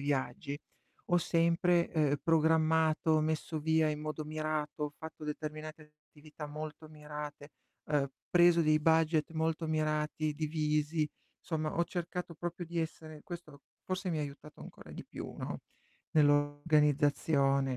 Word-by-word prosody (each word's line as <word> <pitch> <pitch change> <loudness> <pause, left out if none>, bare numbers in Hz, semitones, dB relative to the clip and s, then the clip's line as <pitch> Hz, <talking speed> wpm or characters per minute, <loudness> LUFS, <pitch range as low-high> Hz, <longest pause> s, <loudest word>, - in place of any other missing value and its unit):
viaggi, 140 0 -2 0.5
ho 175 - +4
sempre, 170 +1 +3
ehm, 150 -3 +3
programmato, 160 -1 +3
messo 155 +1 -1
via 160 0 +3
in 150 0 -2
modo 155 0 -4
mirato, 155 -1 -2
ho 145 - -3
fatto 160 -1 -8
determinate 155 0 -6 0.2
attività 150 0 -10
molto 155 +1 -7
mirate, 150 -1 -8 0.4
ehm, 145 -2 +1 0.2
preso 175 -1 +6
dei 155 0 +4
budget 160 0 +3
molto 160 +1 0
mirati, 155 -1 0
divisi, 150 0 0 0.3
insomma 155 -2 -2
ho 170 - +4
cercato 175 -1 -4
proprio 175 +3 -4
di 170 +1 -3
essere 155 -1 -6
questo 160 -5 -9 0.2
forse 185 0 -2
mi 160 - -1
ha - - 0
aiutato 145 +1 -9
ancora - - -11
di - - -8
più, - - -7
no, - - -5 0.5
nell' 150 -2 +6
organizzazione, 145 -2 +3
155 Hz, 135 wpm, -33 LUFS, 150-160 Hz, 0.5 s, preso